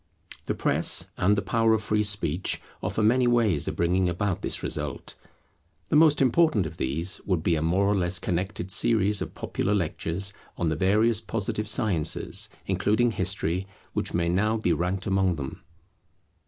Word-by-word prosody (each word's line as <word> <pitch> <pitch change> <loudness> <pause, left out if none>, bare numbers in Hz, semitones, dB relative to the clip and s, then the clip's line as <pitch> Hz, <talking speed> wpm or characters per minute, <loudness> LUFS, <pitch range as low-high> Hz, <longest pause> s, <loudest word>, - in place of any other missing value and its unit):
The - - -2
press - - +3
and 100 +3 +2
the 100 - -2
power 115 -1 +2
of 110 - -2
free 105 0 +1
speech 100 -5 -1 0.2
offer 110 - -1
many 125 +3 +3
ways 115 -10 +2
of - - -3
bringing 90 +2 +1
about 90 +2 -2
this - - -2
result. 75 -3 -4 0.8
The - - +3
most 150 -2 +5
important 130 - +3
of 80 - -7
these 80 +8 -1
would 90 -5 0
be 85 - +2
a 80 - 0
more 90 +5 +1
or 100 - +2
less 90 -2 +1
connected 90 +2 -3
series 105 0 +2
of - - -5
popular 105 - -2
lectures 95 +2 -2 0.2
on 85 - 0
the 80 - -1
various 105 +6 +2
positive 105 -1 -3
sciences, 100 - 0 0.2
including 115 +3 +1
history, 95 -2 -2 0.3
which - - -1
may 85 0 0
now 105 +6 +1
be 90 -6 +1
ranked 90 +2 -2
among 95 -2 +1
them. 80 +6 -7
95 Hz, 170 wpm, -26 LUFS, 85-110 Hz, 0.8 s, most